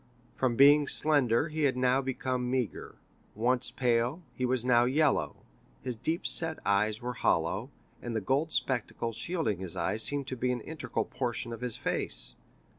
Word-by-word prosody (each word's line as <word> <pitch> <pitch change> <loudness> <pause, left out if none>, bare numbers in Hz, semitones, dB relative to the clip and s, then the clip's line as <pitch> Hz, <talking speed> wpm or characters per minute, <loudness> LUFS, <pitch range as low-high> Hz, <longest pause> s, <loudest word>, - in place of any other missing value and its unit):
From 125 -3 0
being 145 +3 +6
slender 145 -2 +3
he 155 -1 0
had 130 -2 +1
now 130 +1 +2
become 130 -1 -2
meagre; 125 -3 -3 0.4
once 125 +3 0
pale, 125 +6 0
he 125 - -1
was 125 -1 0
now 120 -1 +4
yellow; 145 +3 +1 0.5
his 125 - -3
deep 160 +9 -2
set 165 -1 +4
eyes 105 +3 +1
were 125 0 -3
hollow, 95 +4 0 0.3
and 120 -1 -5
the - - +1
gold 140 +10 0
spectacles 120 -2 -1
shielding 115 - -2
his 95 -3 -5
eyes 110 - 0
seemed 145 +3 -1
to 130 - -3
be 125 +1 0
an 125 -2 -3
integral 155 +4 -4
portion 120 -2 -3
of 115 - -8
his 125 -3 -3
face. - - -3
125 Hz, 170 wpm, -30 LUFS, 115-140 Hz, 0.5 s, being